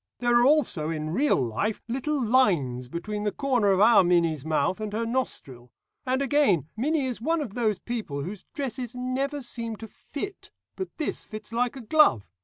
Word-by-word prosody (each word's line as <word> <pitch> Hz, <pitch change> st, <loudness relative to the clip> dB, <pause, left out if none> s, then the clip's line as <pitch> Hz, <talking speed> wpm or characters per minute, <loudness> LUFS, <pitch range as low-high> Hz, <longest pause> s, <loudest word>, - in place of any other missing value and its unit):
There 240 Hz, -1 st, +3 dB
are -, -, +4 dB
also 260 Hz, -, +2 dB
in 155 Hz, -1 st, -3 dB
real 280 Hz, -, +2 dB
life 135 Hz, -, -2 dB
little 270 Hz, +5 st, -1 dB
lines 180 Hz, -, +2 dB
between 205 Hz, +9 st, -4 dB
the 210 Hz, 0 st, 0 dB
corner 250 Hz, -2 st, +1 dB
of 190 Hz, -1 st, +3 dB
our 220 Hz, -1 st, +7 dB
Minnie's 170 Hz, -5 st, +2 dB
mouth 155 Hz, +4 st, 0 dB
and 215 Hz, -1 st, -3 dB
her 230 Hz, +2 st, -1 dB
nostril. 135 Hz, -, -4 dB, 0.4 s
And 260 Hz, +2 st, +1 dB
again, 250 Hz, -, +2 dB
Minnie 285 Hz, +5 st, 0 dB
is 250 Hz, -3 st, -4 dB
one 325 Hz, +6 st, +1 dB
of 260 Hz, -10 st, -4 dB
those 220 Hz, -4 st, 0 dB
people 185 Hz, -11 st, -4 dB
whose 195 Hz, +4 st, -7 dB
dresses 255 Hz, -3 st, -4 dB
never 265 Hz, +3 st, -2 dB
seem 230 Hz, -2 st, -5 dB
to 225 Hz, +1 st, -9 dB
fit, 375 Hz, -, -8 dB, 0.3 s
but 375 Hz, -, -4 dB
this 310 Hz, -, -3 dB
fits 215 Hz, +1 st, -9 dB
like 245 Hz, +2 st, 0 dB
a 265 Hz, -, -7 dB
glove. 230 Hz, -, +4 dB
230 Hz, 185 wpm, -26 LUFS, 180-260 Hz, 0.4 s, our